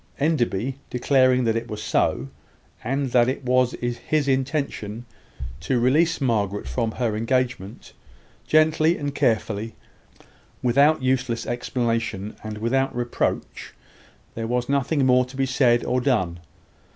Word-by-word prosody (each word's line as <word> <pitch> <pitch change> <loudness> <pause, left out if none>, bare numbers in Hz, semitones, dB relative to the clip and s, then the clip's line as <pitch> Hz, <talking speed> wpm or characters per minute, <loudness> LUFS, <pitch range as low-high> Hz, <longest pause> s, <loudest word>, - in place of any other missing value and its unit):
Enderby 135 -4 0
declaring 130 0 +3
that 115 -1 +1
it 115 +1 -2
was 105 -2 -6
so, 70 -9 0 0.5
and 135 +2 -1
that 120 0 +4
it 130 0 -4
was 125 0 +2
his 130 +5 -2
intention 130 -5 -2 0.5
to 120 +10 0
release 155 +7 +2
Margaret 105 - -1
from 110 - -2
her 115 -4 -1
engagement, 115 -3 -2 0.5
gently 155 +2 +3
and 145 -1 -3
carefully, 110 -2 -1 0.9
without 140 +4 +3
useless 125 -2 0
explanation 115 -4 -2
and 110 -1 -6
without 135 +5 0
reproach, 120 0 -3 0.6
there 115 0 -4
was 125 +1 -1
nothing 140 +1 +1
more 125 0 +5
to 130 +1 -11
be 135 - +1
said 125 -2 +2
or 125 - 0
done. 95 -10 0
125 Hz, 125 wpm, -23 LUFS, 115-135 Hz, 0.9 s, more